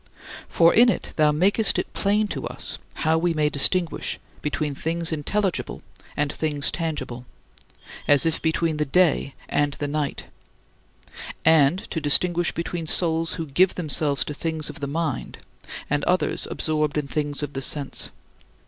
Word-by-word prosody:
For 165 0 +5
in 240 +2 +6
it - - -2
thou 155 -1 +4
makest 195 +8 +2
it - - -3
plain 210 +1 +1
to - - -4
us - - -4 0.3
how 160 +1 +3
we 170 0 0
may 150 -1 +2
distinguish 165 +4 +1 0.2
between 150 0 -2
things 165 +4 -2
intelligible 185 +5 -2 0.3
and 145 0 0
things 150 -3 +1
tangible, 150 -7 -4 0.8
as 145 +2 +5
if 165 -1 0
between 160 -1 0
the 150 - 0
day 150 -2 +2
and 145 -1 +1
the 145 - -4
night 145 -1 -3 1.2
and 160 +3 +4
to 160 - -2
distinguish 175 +4 +3
between 170 -1 -4
souls 165 -1 +2
who 165 - -4
give 175 +6 +2
themselves 150 -4 0
to 150 - -4
things 160 0 -3
of - - -13
the 140 - -3
mind 155 -1 -3 0.5
and 145 0 0
others 180 +1 0
absorbed 155 -1 -1
in 150 -2 -1
things 145 +2 -2
of 145 -1 -5
sense. 140 0 -2
155 Hz, 150 wpm, -24 LUFS, 145-170 Hz, 1.2 s, in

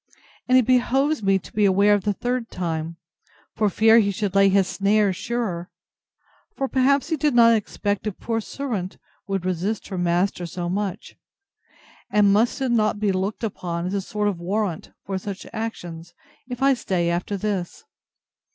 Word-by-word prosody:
And 255 - +5
it 255 - +4
behoves 265 +3 +2
me 195 -1 +3
to 190 - -11
beware 205 -1 +4
of 205 -1 0
the 205 - +1
third 245 +2 -3
time, 165 -2 -4 0.6
for 210 -1 +2
fear 220 +4 +5
he 205 -2 +2
should 200 -1 -2
lay 195 0 +5
his 195 -1 +3
snares 200 -1 +2
surer; 200 -6 -3 0.9
for 270 - -1
perhaps 270 +3 +2
he 320 - +1
did 295 -2 +1
not 230 -1 +7
expect 205 -1 -2
a - - 0
poor 225 +4 -3
servant 215 -7 -4 0.3
would 195 -2 -2
resist 185 +4 -2
her 190 - -4
master 175 +1 0
so 175 +1 -4
much. 200 +1 -4 0.9
And 205 -1 +4
must 225 +6 +2
it 260 -2 0
not 215 -3 +1
be 205 -2 +1
looked 190 +4 -2
upon 175 -5 -3
as 185 - -3
a 200 - 0
sort 210 +2 -2
of 195 -4 -2
warrant 190 -1 -2 0.2
for 195 -1 -3
such 195 0 -7
actions, 175 -7 -6 0.3
if 250 +1 -4
I 275 0 +5
stay 180 -8 -1
after 180 +4 -2
this? 195 - -3
205 Hz, 170 wpm, -23 LUFS, 185-225 Hz, 0.9 s, not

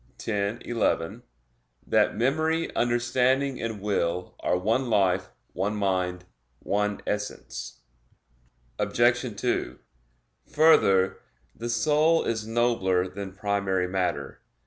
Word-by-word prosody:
x, 105 0 -1
11), 110 -8 -1 0.6
that - - +2
"memory, 160 +6 0
understanding, 125 +3 +1
and 110 -2 -3
will 90 -3 -1
are 90 - +1
one 115 +7 0
life, 95 -4 +2 0.2
one 100 +4 -1
mind, 90 -3 -1 0.3
one 105 +5 -1
essence." 105 0 -5 1.0
Obj. 120 +1 +2 0.2
2: 125 - -1 0.8
Further, 100 -12 +4 0.4
the 120 +1 -5
soul 155 +6 +3
is 110 -1 -2
nobler 110 -6 +1
than 95 +1 -7
primary 100 -2 0
matter. 90 -7 -2
105 Hz, 100 wpm, -26 LUFS, 95-120 Hz, 1.0 s, Further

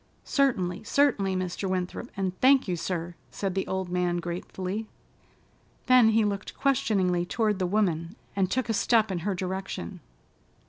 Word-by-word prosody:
"Certainly, 215 -9 +1
certainly, 205 -10 +2
Mr. 185 +1 -2
Winthrop, 185 +6 -3
and 190 -2 -1
thank 265 -1 +5
you, 180 - 0
sir," 170 0 -3 0.2
said 195 -2 -3
the 190 0 -2
old 190 -1 -2
man 180 -1 0
gratefully. 185 +4 -4 1.0
Then 250 -3 +6
he 220 0 +3
looked 200 -1 -3
questioningly 195 -10 +2
toward 210 +2 0
the 185 - +1
woman, 175 -3 0 0.2
and 190 -2 +1
took 260 +3 0
a 225 - 0
step 220 -1 +3
in 180 - -1
her 195 +3 -2
direction. 185 - -4
190 Hz, 150 wpm, -27 LUFS, 180-220 Hz, 1.0 s, Then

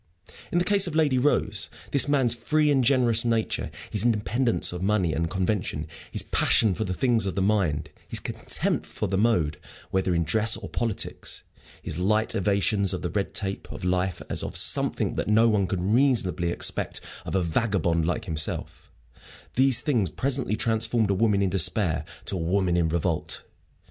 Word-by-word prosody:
In - - 0
the 175 - +2
case 200 -1 +2
of 165 - -5
Lady 145 -5 +3
Rose, 105 -6 0 0.2
this 140 +1 +2
man's 135 -5 +3
free 150 +6 +1
and 135 -2 +3
generous 120 -3 +3
nature, 115 -2 -1 0.2
his 105 -1 +1
independence 115 0 +1
of 90 - -5
money 95 -4 +1
and 85 0 -1
convention, 95 -5 -2 0.3
his - - 0
passion 110 -4 +2
for 110 - -2
the 95 - -2
things 115 -4 +2
of 95 - -3
the 100 - 0
mind, 100 -7 0 0.2
his - - +1
contempt - - 0
for - - -4
the 95 - -2
mode, 90 -10 +1 0.3
whether 95 -2 +1
in 85 - +1
dress 110 +6 +2
or 110 -3 -8
politics, 115 -4 -3 0.4
his 75 - -5
light 105 +4 +1
evasions 100 0 +1
of - - -7
the 90 - -2
red 100 -2 -2
tape 100 -2 -3
of - - -8
life 90 0 -1
as - - 0
of - - -4
something - - +1
that - - -2
no 110 +2 +4
one 100 -3 +1
could 90 -1 -2
reasonably 115 -10 +2
expect - - 0 0.2
of - - -4
a 95 - +2
vagabond 85 -3 0
like 90 +2 -2
himself 80 -4 -2 0.6
these 130 -1 +3
things 115 - +1
presently 130 - -1
transformed 115 -1 +1
a - - +3
woman 100 0 +2
in 95 - +1
despair 85 -3 +2 0.2
to - - +1
a - - -3
woman 90 +1 +1
in 85 -2 +1
revolt. 85 0 -2
105 Hz, 180 wpm, -25 LUFS, 90-115 Hz, 0.6 s, no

